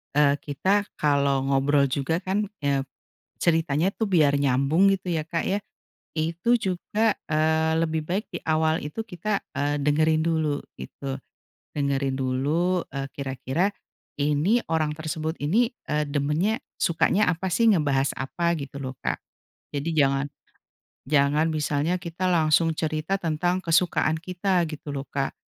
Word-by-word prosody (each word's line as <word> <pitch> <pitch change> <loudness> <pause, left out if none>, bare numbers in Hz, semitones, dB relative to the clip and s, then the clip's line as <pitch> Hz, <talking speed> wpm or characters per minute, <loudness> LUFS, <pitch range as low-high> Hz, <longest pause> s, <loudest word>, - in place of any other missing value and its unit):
eee, 145 -1 +4
kita 190 +8 0
kalau 140 -2 +2
ngobrol 140 +1 +3
juga 140 +5 0
kan 195 +3 0 0.2
eee, 140 -1 +1 0.6
ceritanya 165 0 +2
tuh 220 - 0
biar 150 -6 +4
nyambung 140 +8 +3
gitu 185 -1 -4
ya 155 -1 -1
Kak 165 0 -2
ya, 195 - +1 0.6
itu 170 +10 +2
juga 205 +4 0 0.2
eee, 160 +1 +2
lebih 160 -1 0
baik 190 +6 -2
di - - -3
awal 160 0 +1
itu 150 +9 -5
kita 200 +3 -2 0.2
eee, 145 +1 0
dengerin 155 +2 +2
dulu 160 -3 +1 0.2
gitu, 135 - -6 0.6
dengerin 140 -1 0
dulu, 150 +8 +1
eee, 135 -1 -3
kira-kira 140 +7 -1 0.5
ini 150 +11 +2
orang 160 -2 +1
tersebut 160 +1 -3
ini, 225 - +2 0.2
eee, 150 0 +1
demennya, 150 +9 0 0.2
sukanya 175 +5 +2
apa 180 +2 -3
sih, 225 +5 +4
ngebahas 140 -5 +2
apa 170 +6 0
gitu 140 0 -7
loh, 130 0 -4
Kak. - - -2 0.5
Jadi, 145 +4 -2
jangan 140 -1 +2 0.8
jangan 150 +2 +3
misalnya 155 +2 0
kita 175 +1 -3
langsung 165 -1 +3
cerita 155 +4 -1
tentang 175 +1 0
kesukaan 165 -1 +2
kita, 180 0 0
gitu 150 -2 -7
loh 140 0 -4
Kak, 140 -1 -2
155 Hz, 140 wpm, -25 LUFS, 140-175 Hz, 0.8 s, eee